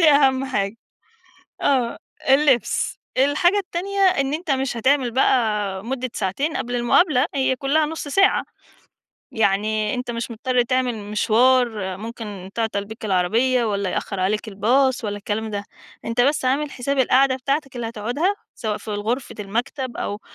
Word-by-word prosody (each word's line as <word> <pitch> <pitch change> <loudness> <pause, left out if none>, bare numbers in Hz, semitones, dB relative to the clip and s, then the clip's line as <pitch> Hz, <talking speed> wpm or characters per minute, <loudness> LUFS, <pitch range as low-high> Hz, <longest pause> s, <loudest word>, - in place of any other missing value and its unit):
دي 320 -2 +7
أهَم 270 -2 +4
حاجة. 215 -5 -2 0.9
آه، 250 -4 +1 0.3
اللبس. 270 -3 +3 0.2
الحاجة 290 +8 +3
التانية 395 +1 -3
إن 300 -8 +3
أنت 325 0 -4
مش 265 -2 0
هتعمل 260 +1 +2
بقى 210 -6 +1
مُدِّة 255 0 -3
ساعتين 275 - -1
قبل 245 -2 -3
المقابلة، 255 +3 +3
هي 265 -1 +1
كُلّها 290 +4 +1
نُص 310 -1 -5
ساعة. 390 +7 +3 0.9
يعني 215 0 +1
أنت 250 -1 -4
مش 235 0 -4
مُضطر 245 +2 +1
تعمل 255 0 0
مشوار 215 -1 +2
ممكن 210 -3 -7
تعطَل 220 -3 -1
بيك 220 +1 -10
العربية 225 +7 +2
والّا 200 -3 -1
يأخّر 195 -2 -3
عليك 210 +4 0
الباص 245 +5 +2
والّا 205 -1 -2
الكلام 215 +2 -3
ده، 205 -1 -4 0.4
أنت 230 +1 0
بس 280 +2 +2
عامل 280 +3 +1
حساب 275 +2 -2
القعدة 260 +1 +4
بتاعتك 275 0 -2
اللي 235 -1 -3
هتقعدها 245 - -1 0.2
سواء 215 -2 -3
في 215 - -8
غرفة 225 +5 -2
المكتب 240 +5 -3
أو 205 +1 -4
245 Hz, 145 wpm, -22 LUFS, 215-275 Hz, 0.9 s, دي